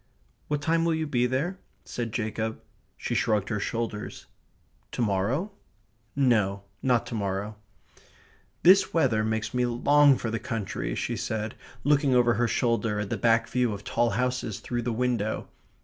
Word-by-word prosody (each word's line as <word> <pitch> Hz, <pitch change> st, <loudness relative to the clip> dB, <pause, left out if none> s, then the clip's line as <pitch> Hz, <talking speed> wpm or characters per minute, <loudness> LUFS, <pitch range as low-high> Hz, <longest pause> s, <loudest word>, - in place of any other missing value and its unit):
"What 145 Hz, -1 st, -2 dB
time 165 Hz, +2 st, +2 dB
will 165 Hz, -1 st, +2 dB
you 160 Hz, 0 st, -1 dB
be 125 Hz, -4 st, +1 dB
there?" 155 Hz, +9 st, -2 dB, 0.3 s
said 120 Hz, -2 st, -4 dB
Jacob. 110 Hz, 0 st, -2 dB, 0.4 s
She -, -, -3 dB
shrugged 105 Hz, -3 st, +1 dB
her 105 Hz, -3 st, -1 dB
shoulders. 115 Hz, 0 st, -4 dB, 0.7 s
"To -, -, -2 dB
morrow?" 115 Hz, -, 0 dB, 0.6 s
No, 105 Hz, -8 st, +2 dB, 0.2 s
not 125 Hz, -3 st, +2 dB
to -, -, -7 dB
morrow. 100 Hz, 0 st, -2 dB, 1.1 s
"This 190 Hz, +1 st, +6 dB
weather 120 Hz, -9 st, +3 dB
makes 110 Hz, 0 st, -2 dB
me 125 Hz, 0 st, +1 dB
long 140 Hz, +3 st, +5 dB
for 115 Hz, -, -3 dB
the 115 Hz, -, -1 dB
country," 100 Hz, -, -3 dB
she -, -, -2 dB
said, 110 Hz, 0 st, -3 dB, 0.3 s
looking 145 Hz, -2 st, +3 dB
over 120 Hz, -1 st, +4 dB
her 120 Hz, 0 st, +1 dB
shoulder 115 Hz, -4 st, 0 dB
at 105 Hz, -, -5 dB
the -, -, +1 dB
back 115 Hz, +2 st, +3 dB
view 120 Hz, -1 st, +1 dB
of 100 Hz, 0 st, -7 dB
tall 120 Hz, +3 st, +1 dB
houses 125 Hz, -4 st, -1 dB
through 120 Hz, -1 st, -3 dB
the 120 Hz, +1 st, -2 dB
window. 115 Hz, -2 st, -1 dB
120 Hz, 160 wpm, -27 LUFS, 110-130 Hz, 1.1 s, This